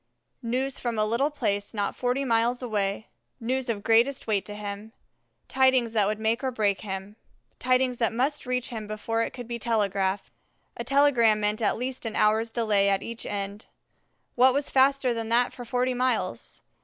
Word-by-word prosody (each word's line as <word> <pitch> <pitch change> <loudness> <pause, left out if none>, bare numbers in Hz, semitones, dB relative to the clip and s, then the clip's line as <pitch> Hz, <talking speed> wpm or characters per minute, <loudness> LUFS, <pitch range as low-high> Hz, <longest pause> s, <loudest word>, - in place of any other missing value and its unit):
News 255 +3 -1
from 235 -2 -2
a 215 - +2
little 235 +7 +1
place 210 -8 -2
not 205 -1 -1
forty 250 +2 -1
miles 240 +1 +1
away 205 -2 -2 0.3
news 255 +1 -2
of 205 -3 -2
greatest 235 +4 +3
weight 210 -3 0
to 205 - -7
him, 210 +1 -7 0.5
tidings 260 -3 +3
that 210 -3 +2
would 210 +1 -1
make 220 +3 0
or 265 - +1
break 210 -5 0
him, 195 +1 -6 0.4
tidings 255 -1 +1
that 230 - +2
must 265 +4 -1
reach 250 0 -1
him 220 -4 -6
before 220 +2 -2
it - - 0
could 245 -2 -9
be 235 0 -4
telegraphed: 200 -4 0 0.4
a - - -5
telegram 255 -6 +4
meant 210 +1 0
at 215 - +1
least 250 0 -4
an 220 - -5
hour's 220 +2 +2
delay 215 -4 +2
at 195 -1 +1
each 230 0 -6
end. 200 +1 -5 0.7
What 255 +1 +5
was 285 0 -1
faster 270 -1 +3
than 225 -1 -4
that 240 +1 +2
for 245 - -8
forty 250 +2 0
miles? 255 +1 -2
230 Hz, 180 wpm, -26 LUFS, 210-255 Hz, 0.7 s, What